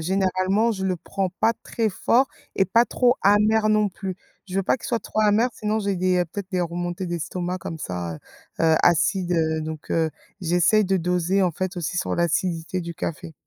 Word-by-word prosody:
généralement 190 +5 +1
je 190 -2 -4
le 185 -1 0
prends 190 +3 -3
pas 225 - +4
très 225 -2 -1
fort 245 +7 +2 0.3
et 195 - +4
pas 230 +5 +4
trop 245 +2 +2
amer 215 +2 +4
non 215 -1 +3
plus. 190 -1 -6 0.3
Je 185 - -4
veux 195 - +1
pas - - +2
qu'il - - -9
soit 235 - 0
trop 215 - -2
amer 215 +3 +4
sinon 215 +1 -1
j'ai 200 -2 -1
des 180 0 +2
peut-être 195 +3 -7
des 185 -2 0
remontées 175 +2 -3
d'estomac 175 +2 -3
comme 165 -2 -6
ça, 90 - -4
heu, 80 - -9 0.5
heu, 160 -1 +5
acides, 175 +2 +3
heu, 160 -1 +1
donc, 155 -1 -6
heu, 160 -1 +1 0.3
j'essaye 180 +5 +3
de 190 +1 +1
doser 180 +2 +1
en 180 -2 +2
fait 185 +3 -3
aussi 175 +1 -3
sur 190 - -1
l'acidité 170 +1 0
du 170 0 -5
café. 170 -1 -5
185 Hz, 200 wpm, -24 LUFS, 170-205 Hz, 0.5 s, heu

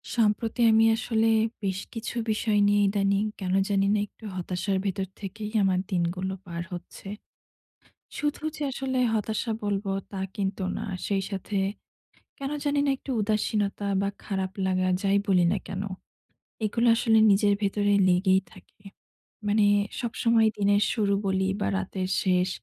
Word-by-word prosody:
সম্প্রতি 225 +1 +1
আমি 220 0 +5
আসলে 225 -2 +1 0.4
বেশ 190 -1 -1
কিছু 230 +1 -5 0.2
বিষয় 215 -1 +1
নিয়ে 205 0 +3
ইদানিং 195 0 +1 0.2
কেন 185 -2 -2 0.2
জানি 195 -1 +2
না 210 - +2
একটু 220 - -16
হতাশার 185 +2 -2
ভেতর 195 0 -1
থেকেই 210 +2 -6
আমার 190 -1 +2
দিনগুলো 180 +1 -1
পার 170 -1 -5
হচ্ছে। 175 +2 -9 1.1
শুধু 295 0 -2
যে - - -10
আসলে 260 0 -2 0.2
হতাশা 220 +2 -1
বলব, 205 0 -1 0.3
তা 195 - -5 0.2
কিন্তু 195 -1 -2
না। - - -4 0.2
সেই 195 -1 0
সাথে 200 +1 -5 0.8
কেনো 275 +1 -3
জানি 290 0 +1
না - - +3
একটু 275 - -8
উদাসীনতা 210 -1 0
বা 200 - 0 0.2
খারাপ 190 -2 -2
লাগা 185 0 +1
যাই 200 0 +3
বলি 185 -3 +4
না - - +1
কেনো, 195 +1 -4 0.8
এগুলি 230 +3 +1
আসলে 225 -1 +3
নিজের 205 +1 +4
ভেতরে 205 0 +1 0.2
লেগেই 190 +1 +4
থাকে। - - -18 0.7
মানে 210 0 +3 0.4
সবসময় 230 -1 +2
দিনের 205 0 +3
শুরু 205 -3 +1
বলি, 190 0 +1
বা - - 0
রাতের 185 - -3
শেষ, 185 -1 +2
200 Hz, 145 wpm, -26 LUFS, 190-220 Hz, 1.1 s, আমি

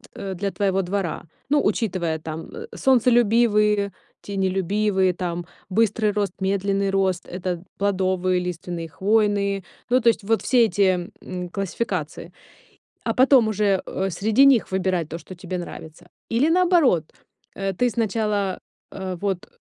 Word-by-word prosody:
э, 195 -1 -5
для 195 +2 -2
твоего 195 -1 +1
двора, 185 -2 -3 0.3
ну, 290 0 +3
учитывая 175 -8 0
там, 155 +1 -6
э, 455 0 -8
солнцелюбивые, 225 -5 +3 0.3
тенелюбивые, 190 0 0
там, 175 -1 -4 0.2
быстрый 215 +1 +2
рост, 205 -3 -1
медленный 195 +1 0
рост- 190 -2 0
это 180 -1 -4
плодовые, 185 -2 +1
лиственные, 175 -1 -5
хвойные. 200 0 +1 0.3
Ну, 250 +1 +4
то 235 - +5
есть 215 - 0
вот 225 +2 +1
все 245 -3 +4
эти, 185 -4 +1
м, 180 -1 -5
классификации, 180 -4 -4 0.7
а 225 - 0
потом 260 -2 +5
уже, 205 -2 +1
э, 195 +1 -2
среди 220 +9 +3
них 260 -8 +4
выбирать 185 -4 0
то, 165 - -5
что 185 - -11
тебе 180 +1 -5
нравится. 175 0 -9 0.2
Или 250 +7 +2
наоборот, 335 - +3 0.5
э, 195 0 -2
ты 245 +7 +1
сначала, 210 -4 -1 0.3
а, 190 -2 -5
вот 190 0 -3
195 Hz, 140 wpm, -23 LUFS, 180-215 Hz, 0.7 s, то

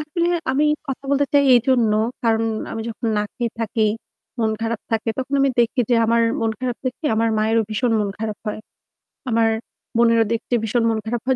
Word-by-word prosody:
আসলে 305 +3 -1 0.2
আমি 280 +3 +2 0.2
কথা 270 0 -5
বলতে 280 0 +2
চাই 285 - +6
এইজন্য, 240 -2 +3 0.3
কারণ 225 -1 +2 0.3
আমি 225 - -4
যখন 230 +1 -5
না - - +1
খেয়ে 240 -2 -2
থাকি, 225 0 -1 0.6
মন 220 -1 +2
খারাপ 230 -1 -2
থাকে 225 0 -1
তখন 265 +2 -2
আমি 275 0 +3
দেখি 235 +1 +2
যে - - +5
আমার 230 +1 +3 0.2
মন 225 - +1
খারাপ 250 -2 -2
দেখতে 255 +5 -4
আমার 230 +1 +2
মায়েরও 220 +1 +2
ভীষণ 235 +2 0
মন 205 - -1
খারাপ 215 -1 -4
হয়। 210 - -3 0.7
আমার 225 -1 +3 0.5
বোনেরও 230 -1 +4
দেখতে 230 +2 -4
ভীষণ 230 +2 +1
মন 225 - 0
খারাপ 230 +1 -2
হয়। 260 0 +2
230 Hz, 190 wpm, -21 LUFS, 225-255 Hz, 0.7 s, চাই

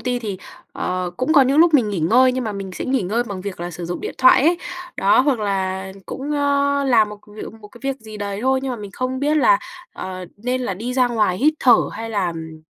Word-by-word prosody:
ty 250 -1 -1
thì, 205 -5 -5 0.3
ờ, 180 -1 -2
cũng 255 +5 0
có 285 -4 +7
những 270 +3 +2
lúc 330 -1 +5
mình 245 -7 +4
nghỉ 200 -4 -2
ngơi 250 +11 +4
nhưng 255 0 -2
mà 215 - -3
mình 195 -1 -6
sẽ - - -5
nghỉ 260 -4 0
ngơi 220 +7 0
bằng 200 -5 -6
việc 195 -3 -6
là 175 - -4
sử 175 0 -7
dụng 175 - -4
điện - - -5
thoại 255 0 +6
ấy. 340 +3 +3 0.4
Đó, 195 +5 +4
hoặc 265 -2 +1
là 190 -1 -2
cũng, 280 +3 -5
ờ, 280 -1 +1
làm 230 -5 +4
một 210 0 -9
việc 210 +1 -8
một 210 - -12
cái 240 - -16
việc 270 0 -3
gì 220 -1 -10
đấy 200 -1 -4
thôi. 265 0 +2
Nhưng 270 - -2
mà - - -4
mình 205 -3 -8
không 255 +3 -3
biết 295 +2 +1
là, - - +5 0.3
ờ, 185 -1 -6
nên 250 +4 -2
là 220 -7 -2
đi 240 +6 -5
ra 255 -1 +3
ngoài 215 -6 +1
hít 305 +4 +3
thở 245 -3 +7 0.2
hay 225 0 -6
là, 200 -4 0
ừm, 160 -1 -8
230 Hz, 260 wpm, -20 LUFS, 195-265 Hz, 0.4 s, có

